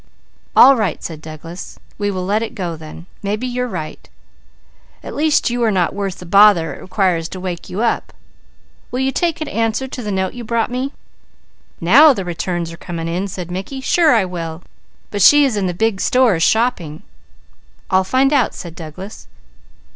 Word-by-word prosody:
"All 275 - +8
right!" 210 -9 -2
said 160 -3 -6
Douglas. 160 +3 -9 0.2
"We 205 0 0
will 185 -2 -3
let 205 +3 +1
it 230 +1 -5
go 175 -5 -3
then. 160 +1 -11 0.2
Maybe 210 +4 -2
you 250 0 -2
are - - -4
right. 165 -9 -7 0.9
At - - -7
least 300 -4 +2
you 240 0 -2
are 230 - +3
not 185 -4 +1
worth 195 -2 -3
the 180 - -10
bother 180 -4 +5
it - - -11
requires 180 -4 0
to 185 - -7
wake 180 -2 -5
you 205 +6 -2
up. 235 - -1 0.8
Will 250 - -3
you 265 0 +1
take 335 +2 -1
an 310 - -3
answer 225 +3 -1
to 255 - -7
the 210 -3 -4
note 190 -1 -1
you 245 - -7
brought 230 +1 -1
me?" 255 +2 -2 0.9
"Now 275 - +7
the 195 -6 -4
returns 175 -1 -3
are - - -11
coming 165 -1 -5
in," 180 +4 -2
said 180 -2 -7
Mickey. 195 +9 -5
"Sure 310 +1 +3
I 215 -4 +3
will; 170 -2 -6 0.5
but 205 - -2
she 290 +8 +7
is 260 -5 0
in 200 -2 0
the - - -1
big 200 +2 -1
stores 245 -10 +3
shopping." 205 -9 +1 0.9
"I'll 190 0 +4
find 260 +8 +2
out," 265 -5 +2
said 170 -3 -8
Douglas. 175 +5 -10
195 Hz, 190 wpm, -18 LUFS, 175-240 Hz, 0.9 s, All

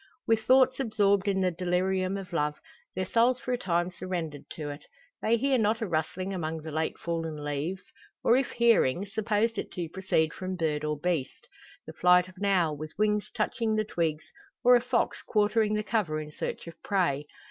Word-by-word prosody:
With 225 -1 +3
thoughts 260 0 +5
absorbed 205 -5 +2
in 195 -1 +1
the 185 -1 +2
delirium 185 +2 0
of 190 -2 -8
love, 150 -2 0 0.4
their 185 0 -1
souls 235 +6 +3
for 250 - -4
a - - +1
time 175 0 0
surrendered 170 -5 -5
to 150 -2 -5
it, 145 - -9 0.4
they 230 +2 +3
hear 265 +1 +2
not 220 +1 +2
a 225 - -1
rustling 180 +3 -2
among 160 -3 -3
the 160 - -6
late 160 +1 -1
fallen 165 -3 -4
leaves; 150 +6 -3 0.4
or, 235 - +5
if 265 0 +1
hearing, 205 - +3
supposed 215 +2 0
it - - -5
to 175 -2 -3
proceed 160 -4 0
from 185 0 -4
bird 155 -4 -1
or 150 0 -1
beast 165 -5 -2 0.4
the - - -9
flight 180 0 +4
of 185 0 -16
an 200 - -3
owl, 175 -6 +2
with 155 +1 -8
wings 210 -1 +1
touching 225 -3 -1
the 215 0 +1
twigs; 165 -6 -1 0.4
or 250 +1 +7
a 240 - +4
fox 250 0 0
quartering 215 0 +2
the 210 - -1
cover 200 -9 0
in 150 0 -7
search - - -5
of 170 0 -11
prey. 150 -8 0
185 Hz, 195 wpm, -28 LUFS, 160-215 Hz, 0.4 s, or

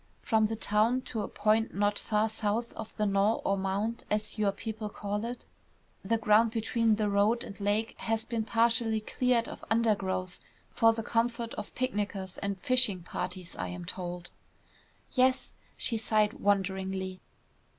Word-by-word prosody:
From 220 -2 +3
the 225 - -3
town 220 +4 +2
to 225 -3 -4
a - - -3
point 215 +2 +1
not 205 +1 +1
far 215 0 +1
south 220 +2 -1
of 220 - -7
the 210 - +1
knoll 200 +2 +2
or 195 - +3
mound, 195 +4 -2
as 210 0 -1
your 205 -2 +3
people 220 0 -5
call 205 0 -3
it, 240 +1 -6 0.6
the 225 +4 +1
ground 220 +1 +4
between 225 0 +1
the 210 0 0
road 205 +4 +2
and 200 -5 -9
lake 205 +2 0
has 225 0 -1
been 230 -3 -1
partially 230 0 +2
cleared 240 +2 +1
of - - -9
undergrowth 200 -5 0 0.3
for 225 0 +5
the 225 0 -3
comfort 230 +1 0
of 210 - -7
picnickers 205 -6 -2
and 200 -1 -2
fishing 250 -8 +2
parties, 180 0 -5
I 90 - -3
am 90 -1 -6
told." 175 - -5 0.8
"Yes." 255 0 +2 0.2
She 230 - +1
sighed 215 -1 +2
wonderingly. 190 -4 -1
215 Hz, 160 wpm, -30 LUFS, 200-230 Hz, 0.8 s, for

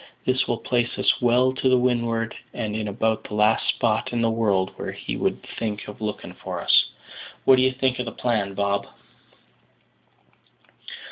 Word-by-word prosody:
This 130 0 +1
will 120 - 0
place 120 0 -1
us - - +2
well 125 +2 +4
to 130 -1 +3
windward, 115 -2 0 0.2
and 110 -3 -3
in 110 -1 -2
about 110 +2 0
the 105 - -6
last 105 +1 +3
spot 110 -2 +1
in 120 -1 0
the 115 - +2
world 100 -5 +1
where - - -5
he - - -5
would - - -1 0.2
think 105 -2 -3
of 105 - -10
looking 105 -1 -4
for - - -6
us. - - +4 0.6
What 130 - +7
do - - +4
you 130 0 +4
think 130 -1 0
of 125 - -1
the 115 - -4
plan, 105 -6 -1
Bob?" 100 0 0
115 Hz, 175 wpm, -24 LUFS, 105-125 Hz, 0.6 s, What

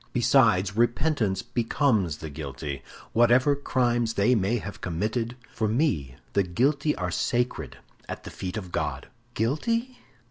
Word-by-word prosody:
Besides, 110 -6 +4
repentance 120 - +1
becomes 115 - +1
the 80 0 -7
guilty; 70 -1 -5 0.3
whatever 125 +5 +5
crimes 120 -4 0
they 105 +5 +4
may 110 +1 +2
have 100 -2 -7
committed, 110 +7 -2 0.2
for 110 - 0
me 105 - 0 0.2
the 100 - +4
guilty 140 - +1
are 90 -2 -2
sacred 120 - -1 0.3
at - - -6
the - - -8
feet 90 +3 -5
of 95 -4 -6
God!" - - -3 0.3
"Guilty? 230 - -1
115 Hz, 135 wpm, -26 LUFS, 90-125 Hz, 0.3 s, whatever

